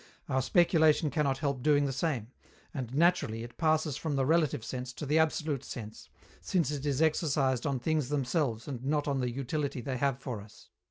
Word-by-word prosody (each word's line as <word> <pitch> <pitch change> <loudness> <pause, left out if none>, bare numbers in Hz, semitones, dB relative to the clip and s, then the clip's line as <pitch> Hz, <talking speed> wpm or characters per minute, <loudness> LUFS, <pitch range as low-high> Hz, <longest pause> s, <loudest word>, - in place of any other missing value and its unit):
Our 130 - +1
speculation 160 -1 +3
cannot 140 -4 +1
help 140 -2 -2
doing 145 +1 +3
the 135 - -1
same; 130 -5 -2 0.4
and, 130 -5 -4
naturally, 150 -7 +2
it 120 0 -11
passes 155 -3 +2
from 150 -1 -2
the 135 -1 +1
relative 155 -6 +2
sense 125 0 -5
to 150 - -6
the 150 +3 +3
absolute 155 -3 0
sense, 110 -2 -8 0.3
since 170 -7 0
it 145 0 -3
is 145 +2 +2
exercised 145 -4 +1
on 140 -2 0
things 155 0 0
themselves 135 -4 -1
and 130 -4 -5
not 145 +2 0
on 140 -2 0
the 125 -1 0
utility 140 +2 -3
they 130 +2 -3
have 135 0 +1
for 125 -6 -5
us. 105 +1 -16
140 Hz, 195 wpm, -30 LUFS, 125-155 Hz, 0.4 s, speculation